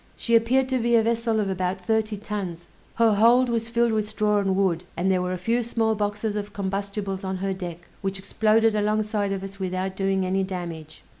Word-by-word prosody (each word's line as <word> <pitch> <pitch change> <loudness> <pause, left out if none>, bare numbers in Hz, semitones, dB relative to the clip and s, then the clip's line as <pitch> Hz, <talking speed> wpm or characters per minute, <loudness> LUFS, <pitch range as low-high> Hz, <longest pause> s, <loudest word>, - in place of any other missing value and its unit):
She 235 - +1
appeared 255 +4 +3
to 260 -1 +1
be 235 0 +2
a 225 - +5
vessel 230 -1 +1
of 205 - 0
about 185 0 -1
thirty 215 +2 0
tons; 195 -5 -5 0.3
her 225 -2 +4
hold 240 +4 +5
was 230 -1 -1
filled 235 0 +2
with 215 -1 -1
straw 210 -1 +1
and 195 -1 +1
wood, 185 -3 +1
and 185 +2 +1
there 185 -1 +2
were 180 0 -2
a 185 - -2
few 230 +7 0
small 225 -1 0
boxes 210 0 -2
of 205 0 -4
combustibles 195 0 -3
on 190 0 -2
her 195 +1 -1
deck, 175 -2 -7
which 195 0 -2
exploded 220 +3 +2
alongside 210 -1 0
of 195 -1 -3
us 195 0 -8
without 185 0 -2
doing 195 -1 0
any 190 +1 +1
damage. 170 -4 -6
205 Hz, 210 wpm, -25 LUFS, 190-220 Hz, 0.3 s, a